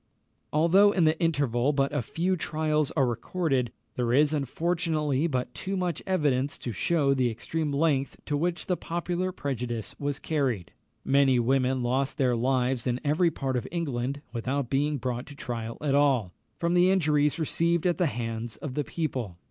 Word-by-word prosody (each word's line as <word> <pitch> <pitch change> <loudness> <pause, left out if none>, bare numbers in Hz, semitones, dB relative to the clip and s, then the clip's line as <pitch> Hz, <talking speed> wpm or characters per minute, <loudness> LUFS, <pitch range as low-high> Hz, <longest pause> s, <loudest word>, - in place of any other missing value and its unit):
Although 185 +7 +5
in 180 - +2
the 155 0 +3
interval 140 -5 +1
but 140 0 +1
few 180 +10 0
trials 155 -3 0
are 135 - +4
recorded, 125 +1 -1 0.2
there 120 -1 0
is, 150 +3 +4
unfortunately, 155 0 0
but 125 -5 -2
too 195 +8 -3
much 180 -2 -1
evidence 145 -7 +1
to 120 - -5
shew 140 - +2
the 130 -2 +2
extreme 150 +7 -3
length 140 -2 +1
to 145 - -1
which 170 +4 -1
the 180 - +1
popular 175 +2 -2
prejudice 125 - -4
was 145 -1 -2
carried. 130 - -1 0.3
Many 135 -2 +4
women 130 +1 +1
lost 130 +4 0
their 130 -4 +2
lives 125 0 0
in 125 0 0
every 155 +4 +3
part 135 -4 -3
of 120 - -2
England 140 -4 -2
without 130 +2 -2
being 145 +2 +1
brought 125 -1 -3
to 145 - -10
trial 115 -3 -5
at 145 -2 0
all, 135 -10 +3 0.2
from 170 0 0
the 180 +1 +5
injuries 150 -5 +2
received 170 +1 0
at 175 0 +1
the 175 - +3
hands 115 -2 -4
of 145 - -6
the 150 - -1
people. 125 - -3
140 Hz, 170 wpm, -27 LUFS, 125-160 Hz, 0.3 s, Although